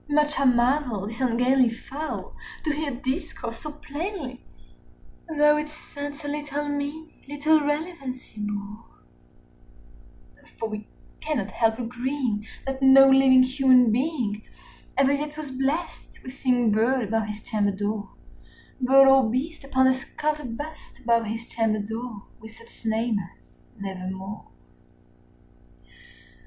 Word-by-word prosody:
Much 295 0 +2
I 275 - +2
marvelled 245 -4 +2
this 230 +3 -7
ungainly 250 +1 +3
fowl 275 +6 -6 0.3
to 310 - +1
hear 300 0 -2
discourse 260 -2 -4
so 300 - -6
plainly, 295 -3 -6 1.0
Though 300 0 +5
its 300 +1 -7
answer 285 +1 -5
little 295 0 -3
meaning 290 +2 -5
little 300 +2 +3
relevancy 295 -6 -4
bore; 210 +1 -5 1.6
50 - - -24
For 225 - -3
we 215 0 -6 0.3
cannot 250 -11 -2
help 225 +2 +1
agreeing 245 -2 -2 0.2
that 270 0 -3
no 270 0 +8
living 265 -1 +7
human 255 -2 +5
being 240 -5 -1 0.6
Ever 275 0 +4
yet 295 +1 -3
was 300 -3 -6
blessed 275 +6 -3
with 255 - -8
seeing 250 -4 +2
bird 235 +4 +2
above 220 0 -1
his 210 0 -6
chamber 210 -3 0
door, 205 +1 -3 0.7
Bird 270 +2 +7
or 270 -4 +6
beast 275 +7 -3
upon 260 -1 +2
the 260 - +5
sculptured 285 -1 -3
bust 310 +1 -9
above 230 -3 +1
his 225 +2 -5
chamber 225 -2 0
door, 220 +1 -5 0.2
With 220 0 -12
such 230 0 -12
name 220 0 +1 0.2
as - - -30
"Nevermore." 190 +1 -6
260 Hz, 130 wpm, -25 LUFS, 225-290 Hz, 1.6 s, no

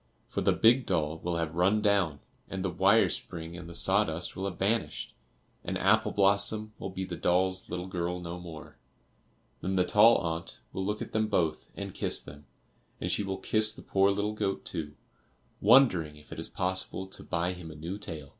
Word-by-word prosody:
For - - -3
the - - +3
big 120 +3 +4
doll 80 -3 0
will 85 0 -2
have 80 -1 -2
run 95 +5 +3
down, 100 -9 +1 0.3
and 95 0 -3
the 90 - 0
wire 95 +5 +4
spring 85 0 -6
and 85 -1 -8
the 85 - -8
sawdust 90 -3 +1
will 95 - -3
have 95 -3 -4
vanished, 110 +4 -1 0.5
and - - -2
Apple 110 +2 +3
blossom 105 +2 +2
will - - -4
be 95 0 -4
the - - -5
doll's 95 +1 +1
little 90 0 -4
girl 90 -1 -3
no 90 0 -6
more. 85 -3 -10 0.8
Then 95 +1 -1
the 90 -1 +3
tall 110 +5 +6
aunt 85 0 -4
will 95 - -2
look 105 +2 -2
at - - -10
them 110 0 +1
both 85 -7 0
and - - -5
kiss - - -1
them; 75 0 -12 0.5
and - - -2
she - - +1
will 95 -1 -3
kiss 110 +2 +2
the - - -11
poor 95 0 +3
little 100 +1 0
goat 100 -2 -2
too, 75 -2 -4 0.7
wondering 100 - +5
if 75 0 -17
it - - -6
is - - -5
possible 95 +1 -1
to 95 - -6
buy 85 +1 -1
him 90 -2 -9
a 80 - -10
new 85 +6 -5
tail. 80 -8 -7
95 Hz, 200 wpm, -29 LUFS, 85-100 Hz, 0.8 s, tall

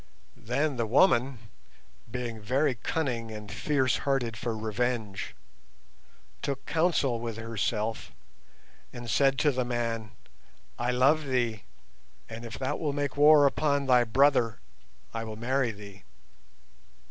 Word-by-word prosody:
Then 135 +4 0
the 115 -1 0
woman, 130 - +3 0.7
being 120 -2 -5
very 130 +6 +1
cunning 120 -2 -2
and 105 -1 -8
fierce 135 -4 +1
hearted 130 -5 -1
for 110 +1 -3
revenge, 110 -1 -2 1.1
took 140 -1 -3
counsel 160 -7 +1
with 115 -1 -5
herself 115 0 -2 0.8
and 120 0 -8
said 135 +5 +3
to 150 - +3
the 130 -1 -1
man, 115 -3 -2 0.7
'I 120 +1 0
love 145 +5 +3
thee, 120 -6 -1 0.6
and 115 +1 -8
if 115 - -7
thou 130 -1 -2
wilt 145 -3 -2
make 145 -2 -2
war 145 0 +7
upon 140 0 +1
thy 125 -2 +5
brother 125 -1 +3 0.5
I 115 0 -3
will 110 -1 -6
marry 125 +3 0
thee. 100 -2 -10
120 Hz, 125 wpm, -28 LUFS, 115-140 Hz, 1.1 s, war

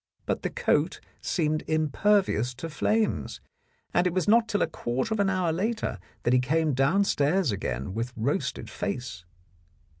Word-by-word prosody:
But - - -1
the - - -1
coat - - +1 0.2
seemed 155 -3 0
impervious 155 - +2
to 165 +6 -6
flames, 215 +8 0 0.5
and 180 - +3
it 175 - -1
was 185 -4 +1
not 225 +2 +5
till 205 -3 +2
a - - +1
quarter 130 - -2
of 220 - -2
an 200 -1 +3
hour 185 -3 +1
later 210 - -2 0.2
that 120 - +2
he 125 - +5
came 155 +4 +1
downstairs 150 - +2
again 70 -6 -3
with 115 +3 -3
roasted 140 - -1
face. 125 - -5
155 Hz, 155 wpm, -27 LUFS, 125-195 Hz, 0.5 s, not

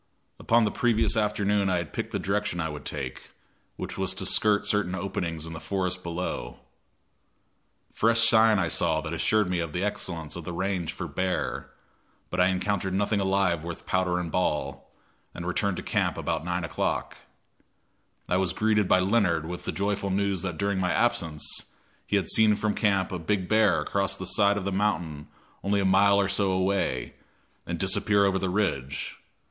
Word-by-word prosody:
Upon 115 0 +3
the 105 - 0
previous 115 -2 +1
afternoon 105 -2 +1
I 90 - +2
had 85 -3 -4
picked - - -4
the - - -1
direction 100 -2 -1
I 80 -1 -1
would 75 -1 -8
take, - - -6 0.5
which - - -6
was - - 0
to - - -3
skirt 105 -1 +3
certain 100 -3 +1
openings 85 -4 -3
in 80 - -7
the 80 - -6
forest 90 -1 -2
below. 85 -8 -5 1.3
Fresh 115 +1 +3
sign 110 -1 +5
I 90 -3 +1
saw 80 -1 +1
that 80 0 -5
assured 105 +5 +2
me 90 -1 -1
of 85 -3 -3
the 90 - -1
excellence 85 -6 -3
of 85 - -6
the 85 +2 -6
range 90 -2 -2
for - - -6
bear, 95 0 -2 0.6
but - - -2
I 90 - +5
encountered 95 0 -1
nothing 105 +1 +1
alive 95 -4 +1
worth 85 -1 -7
powder 90 -1 +1
and 85 -2 -4
ball, 85 -4 -1 0.5
and 85 - -6
returned 95 +1 0
to - - -5
camp - - 0
about - - -2
9 90 0 -2
o'clock. 80 - -2 1.1
I 90 - +1
was 95 -2 0
greeted 105 -2 +2
by 90 - +4
Leonard 90 -5 +2
with 90 +2 -6
the - - -1
joyful 100 0 -1
news 100 -1 0
that 90 -4 -4
during 100 -1 0
my 90 -1 +1
absence 80 -3 0 0.6
he - - 0
had 100 - +1
seen 110 -1 +4
from 105 0 -1
camp 100 -3 +1
a 90 - -3
big 95 +2 -1
bear 110 0 +3
cross 100 0 0
the 95 - -6
side 100 +1 +3
of 100 - -4
the 100 - -1
mountain 85 -7 -1 0.4
only 100 +1 +1
a 100 - +1
mile 100 +1 +5
or 100 - +2
so 100 0 +1
away, 95 -9 0 0.5
and 85 - -2
disappear 100 +3 +2
over 95 -1 +1
the 95 - -1
ridge. 80 -9 -2
95 Hz, 185 wpm, -27 LUFS, 85-100 Hz, 1.3 s, sign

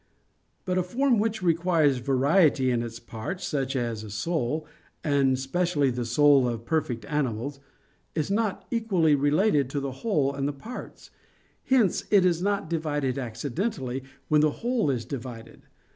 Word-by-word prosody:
But 185 -1 +1
a - - +3
form 240 +6 +1
which 220 -2 -1
requires 165 -5 +3
variety 135 +1 +3
in 120 - +1
the 115 0 -5
parts, 180 - -5
such 135 -5 -2
as 115 -4 -2
a 110 - -8
soul, 155 - -2 0.4
and 140 -3 +2
specially 145 0 0
the 120 0 -3
soul 140 +2 +5
of 115 -1 -4
perfect 135 -6 -1
animals, 140 -1 -2 0.6
is 155 +3 -1
not 215 -1 -1
equally 195 -10 +2
related 145 - +2
to 140 - -2
the 135 -1 -3
whole 150 -12 +1
and 140 0 -2
the 145 - -2
parts: 225 - -10 0.5
hence 245 -8 +2
it 200 -3 +5
is 175 -2 +2
not 200 -3 0
divided 145 -5 -1
accidentally 130 - -3 0.3
when 150 -1 +4
the 155 - +4 0.2
whole 240 - +1
is 120 -5 -1
divided. 120 -3 -8
145 Hz, 155 wpm, -26 LUFS, 130-180 Hz, 0.6 s, soul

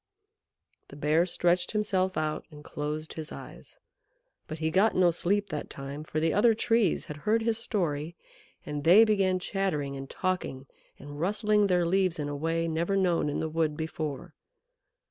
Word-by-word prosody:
The - - -12
Bear 155 +4 +2
stretched 175 +1 +1
himself 190 -3 0
out 155 -1 -2
and 150 -2 -13
closed 150 +2 -4
his 160 -1 -7
eyes; - - -11 0.7
but 155 - -6
he 160 0 -1
got 200 +6 +3
no 180 -2 +4
sleep 200 +4 0
that 150 -3 -5
time, 140 +2 -7
for 155 0 -3
the 160 0 +1
other 225 +2 +4
Trees 225 -4 +1
had 150 - -7
heard 220 +9 +1
his 230 0 +1
story, 170 -8 -2 0.5
and 150 -1 -4
they 185 +8 +8
began 195 -4 +2
chattering 180 -7 -2
and 135 0 -7
talking 180 -8 -3 0.3
and 145 +1 -10
rustling 210 +3 +2
their 180 -2 +2
leaves 185 0 +1
in 150 -2 -3
a 145 - -4
way 165 +3 -1
never 170 +4 0
known 175 -5 +1
in 145 - -2
the 160 - -1
wood 155 -1 -1
before. 155 -3 -5
165 Hz, 170 wpm, -28 LUFS, 150-195 Hz, 0.7 s, they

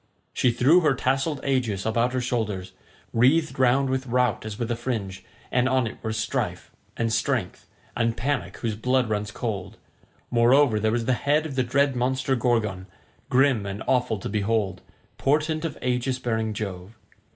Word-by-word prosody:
She 125 - +2
threw 130 +9 +5
her 150 -6 +2
tasselled 135 +3 -1
aegis 125 -8 0
about 115 +3 +1
her 130 - 0
shoulders, 110 -7 -2 0.4
wreathed 140 +6 +3
round 130 +2 +4
with 130 0 -2
Rout 125 -2 +1
as 105 -1 -6
with 120 0 -3
a - - +1
fringe, 110 -6 -4 0.3
and 125 +1 +2
on 130 -2 +2
it 110 - -6
were 110 - -3
Strife, 110 +1 -3 0.3
and 115 -1 0
Strength, 115 -4 -1 0.3
and 115 -1 0
Panic 140 +3 -2
whose 115 -3 -2
blood 125 +2 +1
runs 105 -1 -1
cold; 105 -4 -4 0.5
moreover 120 0 +4
there 110 +1 +1
was 115 0 -1
the 130 - +2
head 145 +5 +1
of 155 - -5
the 130 - +1
dread 135 +2 +1
monster 130 +2 0
Gorgon, 110 -6 0 0.4
grim 130 -5 +3
and 100 +2 -5
awful 125 -4 +1
to - - -6
behold, 100 -3 -1 0.4
portent 155 +3 +1
of 160 - -4
aegis 125 +1 0
bearing 110 -3 -1
Jove. 100 0 -6
120 Hz, 170 wpm, -25 LUFS, 110-130 Hz, 0.5 s, threw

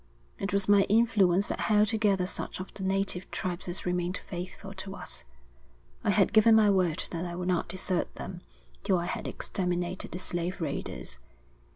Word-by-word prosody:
It 195 - -2
was 200 -1 +1
my 205 -1 +7
influence 205 -4 +4
that - - -2
held 210 -1 +4
together 205 -4 +2
such 185 - -3
of 185 - -7
the - - -7
native 190 -1 0
tribes 180 -1 -3
as 175 +1 -3
remained 180 +1 0
faithful 185 +2 -7
to 195 0 -6
us. - - -8 0.8
I - - +1
had - - +3
given 220 +1 +7
my 215 -2 +6
word 185 -4 +2
that 170 0 -3
I 175 -1 -4
would 180 +1 -2
not 180 -2 +1
desert 185 0 -2
them - - -7 0.4
till 190 - +3
I 170 - -1
had - - -3
exterminated 180 -1 -2
the - - -4
slave 180 +1 -3
raiders. 140 - -4
185 Hz, 180 wpm, -29 LUFS, 175-200 Hz, 0.8 s, my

